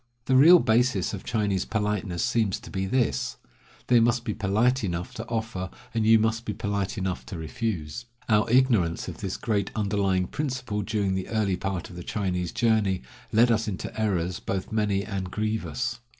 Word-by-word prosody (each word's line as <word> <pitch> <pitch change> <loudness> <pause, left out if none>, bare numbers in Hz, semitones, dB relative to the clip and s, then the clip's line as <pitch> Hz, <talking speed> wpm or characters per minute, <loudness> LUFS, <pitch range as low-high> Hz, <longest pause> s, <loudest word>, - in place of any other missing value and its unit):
The 130 - +2
real 160 +7 +9
basis 115 - +2
of 100 - -5
Chinese 100 -4 0
politeness 105 -4 -1
seems 115 -6 +1
to - - -11
be 95 0 -2
this: 125 +3 0 0.5
They 120 -1 +5
must 120 +1 +2
be 105 - -1
polite 110 +5 +1
enough 90 -2 -3
to 110 +1 -6
offer, 110 -5 -3 0.2
and 110 -2 +1
you 115 0 +8
must 110 +1 0
be 105 - -3
polite 100 0 -2
enough 95 -2 -2
to 100 -6 -6
refuse. 80 +3 -4 0.2
Our 110 0 +3
ignorance 115 -10 +3
of - - -6
this 95 -1 -3
great 105 -3 -1
underlying 100 -3 +1
principle 130 -5 -3
during 100 -2 -1
the 95 0 -2
early 105 -4 +1
part 95 -1 -4
of - - -11
the 90 - -6
Chinese 90 -4 -2
journey 110 - +1 0.3
led 115 +3 +5
us 110 -1 +1
into 95 -3 -4
errors 90 -5 0
both 95 -1 -4
many 105 -2 +1
and 95 -3 -4
grievous. 110 +5 -2
105 Hz, 180 wpm, -26 LUFS, 95-115 Hz, 0.5 s, real